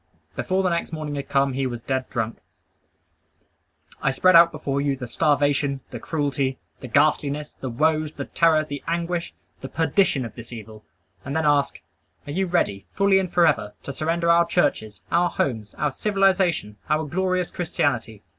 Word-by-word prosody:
Before 190 +1 0
the 185 - +2
next 170 - -2
morning 155 -2 -4
had 140 0 -5
come 140 -1 +2
he 135 0 -1
was 120 -2 -5
dead 130 +2 -3
drunk! 115 -2 -3 1.6
I - - +2
spread 185 +7 +4
out 170 0 +8
before 140 -2 -2
you 140 -1 0
the 130 -1 -6
starvation, 140 +1 +1
the 120 - -6
cruelty, 140 -2 -1 0.2
the 130 - -8
ghastliness, 145 +3 +1
the 130 - -6
woes, 155 +4 +1
the 140 - -5
terror, 160 -2 +3
the 145 -2 -7
anguish, 170 +1 -2 0.3
the 135 - -6
perdition 160 -2 +1
of 115 - -8
this 115 0 -11
evil, 110 -2 -10 0.4
and 140 0 -5
then 160 -1 +1
ask, 145 -1 +2 0.4
Are 145 - -6
you 190 +5 0
ready, 105 - 0
fully 195 -1 +4
and 185 -2 -3
forever, 150 -12 +2
to 140 - -6
surrender 170 +3 +1
our 170 0 +4
churches, 110 -11 0
our 175 +1 +3
homes, 110 -6 -2
our 150 0 0
civilization, 190 - +1
our 155 +1 +1
glorious 185 +3 -1
Christianity? 120 - -2
145 Hz, 170 wpm, -24 LUFS, 130-170 Hz, 1.6 s, out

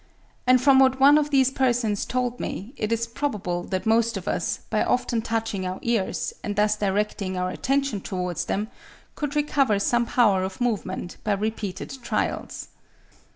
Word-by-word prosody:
and 255 0 +6
from 265 +1 +5
what 265 0 +4
one 280 +2 +7
of 300 -1 +2
these 265 -2 +3
persons 240 -6 +1
told 250 -1 -2
me, 215 +7 -5
it 215 -3 -3
is 230 0 +1
probable 210 -8 -3
that 185 +1 -3
most 225 0 +2
of 185 - -8
us, 170 - -1
by 215 - +2
often 240 -2 0
touching 225 -4 -2
our 185 0 -3
ears, 230 -5 -1
and 205 - -3
thus 210 +1 +3
directing 200 -2 -1
our 180 0 -1
attention 275 -6 -1
towards 180 -2 -3
them, 205 +4 -1 0.5
could 295 -1 -4
recover 275 -7 +2
some 235 +4 +1
power 205 -7 +3
of 190 0 -5
movement 200 -7 -2
by 210 - +1
repeated 210 +1 -3
trials. 235 - -3
225 Hz, 165 wpm, -25 LUFS, 195-255 Hz, 0.5 s, one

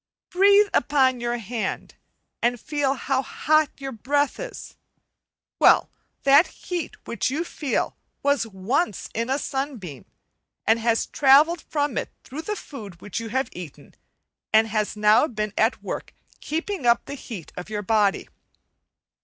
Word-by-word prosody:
Breathe 400 +2 +5
upon 260 -2 +3
your 240 0 -1
hand, 230 0 -4 0.5
and 240 +1 +1
feel 280 +1 0
how 265 0 0
hot 310 +2 +2
your 270 -1 -6
breath 285 +5 0
is; - - -8 0.8
well, - - +5 0.3
that 280 +5 +6
heat 350 -4 -5
which 235 0 -1
you 300 +6 -1
feel, 290 -6 -2 0.3
was 285 -4 +2
once 210 - -1
in 230 +2 -2
a 265 - +2
sunbeam, 265 - -4 0.6
and 225 +1 +4
has 230 0 +1
travelled 300 +5 +5
from 290 -4 -1
it - - -6
through 290 +4 -7
the 420 +5 -3
food 215 - -9 0.2
you 230 -1 -6
have 260 +2 -1
eaten, 175 -5 -10 0.6
and 220 0 +4
has 215 0 -1
now 210 +7 +5
been 215 -4 -3
at 220 +3 +1
work - - -6 0.2
keeping 325 -2 -3
up 235 - +4
the - - -7
heat 225 - -8
of 180 +3 -7
your 210 -1 -3
body. 205 -2 +2
260 Hz, 145 wpm, -24 LUFS, 220-290 Hz, 0.8 s, that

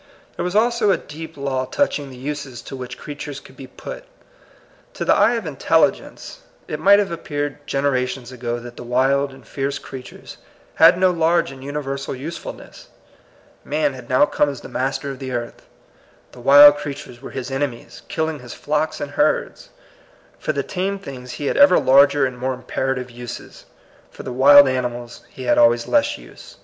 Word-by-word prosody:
There - - -3
was 180 +2 -3
also 230 0 +3
a 195 - +4
deep 160 +1 -10
law 135 -2 -2
touching 145 - -1
the 130 - -11
uses 135 -2 -6
to - - -8
which, 125 -2 -7
creatures 145 -1 -7
could 130 - -17
be 135 - -10
put. - - -9 0.9
To - - -3
the - - +5
eye - - +4
of - - -3
intelligence - - 0 0.3
it - - -4
might 200 +1 +6
have 205 -2 0
appeared 145 -4 -4
gen 135 0 -1
erations 130 -2 -1
ago 120 -1 -4
that 120 0 -10
the - - -7
wild 135 +3 +1
and 135 -3 -16
fierce 140 0 -3
crea 130 - -9
tures - - -12 0.4
had 165 +2 +6
no 185 0 +4
large 170 -2 +1
and 135 -1 -11
universal 140 -1 -4
usefulness. 150 +6 -9 0.8
Man 150 -1 0
had 125 -2 -11
now 130 +3 +5
come 150 - +1
as 140 -3 -7
the - - -10
master 135 +2 -2
of 135 - -9
the 130 -2 -5
earth. 120 -1 -5 0.6
The 125 - -13
wild 145 +3 +8
creatures 140 -4 -8
were - - -8
his 135 0 -6
ene 140 +1 0
mies, 120 -2 -13
killing 160 -2 -2
his 125 -2 -10
flocks 150 +1 -1
and 145 - -5
herds. - - 0 0.7
For - - -1
the 140 -2 -2
tame 195 +4 -2
things 130 -9 -9
he 145 - -5
had - - 0
ever 285 0 +7
larger 140 +1 +5
and 125 -1 -5
more 130 +1 -1
imperative 125 0 -3
uses. 120 0 -9 0.4
For - - -11
the 125 - -5
wild 140 +2 +8
ani 130 -1 0
mals 120 -1 -9
he 130 - -10
had 125 - +3
always 120 0 +4
less 290 0 +2
use. - - -14
140 Hz, 190 wpm, -21 LUFS, 130-150 Hz, 0.9 s, wild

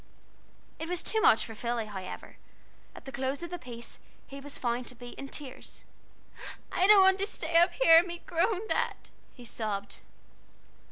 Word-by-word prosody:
It 325 - -5
was 360 -1 -2
too 440 - 0
much 225 - +5
for 225 - -8
Philly, 235 +1 -2
however. 190 -3 -8 0.6
At - - -12
the 270 - -7
close 270 +3 -3
of 345 - -6
the 355 - -4
piece 235 -3 -10 0.3
he 275 - -9
was 285 0 -7
found 240 0 -2
to 250 - -11
be 245 +1 -10
in 275 +2 -8
tears. 280 -4 -10 0.9
"I 370 - +3
don't 410 -2 +8
want 380 0 +5
to 395 - 0
st 335 -5 -5
a - - -2
a - - +9
y - - +8
up - - -12
here 330 -10 +7
and 350 - -1
be 345 0 -5
groaned 380 +5 0
at," - - -1 0.2
he 245 - -12
sobbed. 205 -3 -4
275 Hz, 200 wpm, -29 LUFS, 240-355 Hz, 0.9 s, a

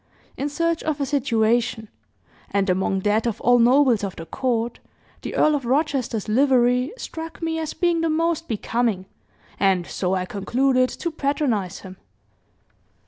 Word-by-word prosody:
in 285 - -2
search 335 +2 0
of 310 -2 -2
a 280 - 0
situation; 235 -4 +1 0.6
and 195 -1 +1
among 190 +1 0
that 210 +3 +1
of 230 -1 -2
all 245 0 +4
nobles 245 -2 +4
of 195 -2 -3
the 165 - -8
court, 235 - -2 0.4
the - - -6
Earl 305 - +4
of 285 -3 -1
Rochester's 260 -4 -1
livery 250 +2 +3
struck 325 -8 -7
me 325 -1 -2
as 315 -1 -4
being 345 -2 +1
the 330 - +1
most 330 +1 0
becoming, 225 -3 -1 0.5
and 190 -3 +2
so 185 +1 -2
I 185 -1 -1
concluded 255 +6 +1
to 340 - -4
patronize 275 - -1
him." 185 -1 -11
245 Hz, 150 wpm, -23 LUFS, 215-290 Hz, 0.6 s, all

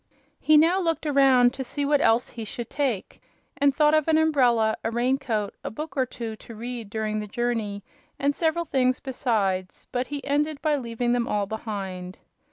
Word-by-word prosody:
He 310 0 +5
now 335 +5 +4
looked 330 -3 -1
around 265 -4 +5
to 265 - -4
see 285 +3 -3
what 290 0 +3
else 230 +2 +3
he 230 - -7
should 230 +2 -7
take, 260 -9 -2 0.4
and 280 0 +4
thought 300 +2 +3
of 310 -1 +3
an 320 -1 +4
umbrella, 245 -8 +3
a - - 0
rain 245 +4 +1
coat, 210 -6 -2
a - - -3
book 305 +7 -7
or 260 -2 +1
two 230 -2 -6
to 230 - -12
read 235 -1 -6
during 215 0 -2
the 210 - -5
journey, 215 -3 -2 0.3
and 285 +1 +1
several 330 +2 0
things 255 -4 +1
besides; 205 -8 -1
but 250 0 -1
he 285 -1 -5
ended 295 +1 0
by 305 -2 +3
leaving 240 -2 -1
them 240 -1 0
all 205 -1 0
behind. 195 -4 -5
245 Hz, 190 wpm, -25 LUFS, 220-285 Hz, 0.4 s, He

